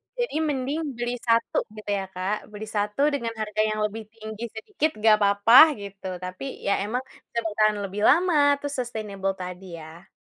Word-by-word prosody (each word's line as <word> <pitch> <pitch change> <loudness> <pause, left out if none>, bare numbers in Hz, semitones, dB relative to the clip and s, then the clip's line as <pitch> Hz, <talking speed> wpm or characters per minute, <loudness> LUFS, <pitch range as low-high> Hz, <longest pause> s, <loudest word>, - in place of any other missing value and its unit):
Jadi 485 -8 -2
mending 290 -1 -1 0.2
beli 240 +1 -2
1 230 0 +1 0.2
gitu 215 -1 -9
ya 195 - -4
Kak, 190 +3 -3
beli 210 +1 -7
1 210 +4 -1
dengan 235 -5 -2
harga 215 -1 -2
yang 215 0 -2
lebih 220 +1 -5
tinggi 220 +1 -7
sedikit 310 - -1
enggak 215 0 +5
apa-apa 200 +3 +4 0.3
gitu, 200 -1 -8 0.2
tapi 185 +9 -7
ya 200 - +2
emang 245 +5 -2 0.3
bisa 235 - -2
bertahan 215 0 +2
lebih 200 +2 -5
lama 350 +2 +4 0.3
terus 285 0 -4
sustainable 205 -5 -3
tadi 180 0 -7 0.2
ya. 160 +3 -12
215 Hz, 170 wpm, -25 LUFS, 200-240 Hz, 0.3 s, enggak